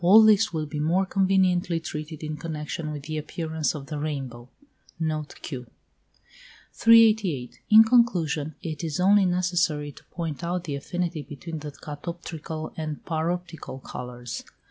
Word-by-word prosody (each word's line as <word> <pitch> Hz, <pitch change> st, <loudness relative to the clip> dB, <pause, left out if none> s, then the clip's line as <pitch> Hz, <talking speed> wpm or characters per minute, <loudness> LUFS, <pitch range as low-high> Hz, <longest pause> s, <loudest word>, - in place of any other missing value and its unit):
All 205 Hz, +6 st, +9 dB
this 215 Hz, -2 st, +5 dB
will 160 Hz, -2 st, -2 dB
be 150 Hz, 0 st, -5 dB
more 170 Hz, +6 st, +2 dB
conveniently 185 Hz, -3 st, +2 dB
treated 155 Hz, -1 st, -6 dB
in 155 Hz, 0 st, -3 dB
connexion 150 Hz, 0 st, -4 dB
with 145 Hz, -2 st, -6 dB
the 155 Hz, +1 st, -3 dB
appearance 160 Hz, 0 st, -2 dB
of 140 Hz, -2 st, -6 dB
the 150 Hz, 0 st, -4 dB
rainbow. 135 Hz, -5 st, -4 dB, 0.5 s
Note 155 Hz, -2 st, -2 dB
Q. 125 Hz, -5 st, -6 dB, 1.1 s
388. 215 Hz, -, +4 dB
In 220 Hz, 0 st, +10 dB
conclusion 170 Hz, -, +2 dB
it 160 Hz, -2 st, -4 dB
is 160 Hz, 0 st, -2 dB
only 195 Hz, +1 st, +5 dB
necessary 175 Hz, -5 st, +1 dB
to -, -, -16 dB
point 165 Hz, -2 st, -5 dB
out 175 Hz, +1 st, -1 dB
the 155 Hz, -4 st, -4 dB
affinity 170 Hz, +2 st, -3 dB
between 155 Hz, +3 st, -7 dB
the 150 Hz, 0 st, -6 dB
catoptrical 155 Hz, +1 st, -6 dB
and 155 Hz, -2 st, -5 dB
paroptical 165 Hz, -4 st, -3 dB
colours. 125 Hz, -1 st, -6 dB
160 Hz, 145 wpm, -26 LUFS, 150-180 Hz, 1.1 s, In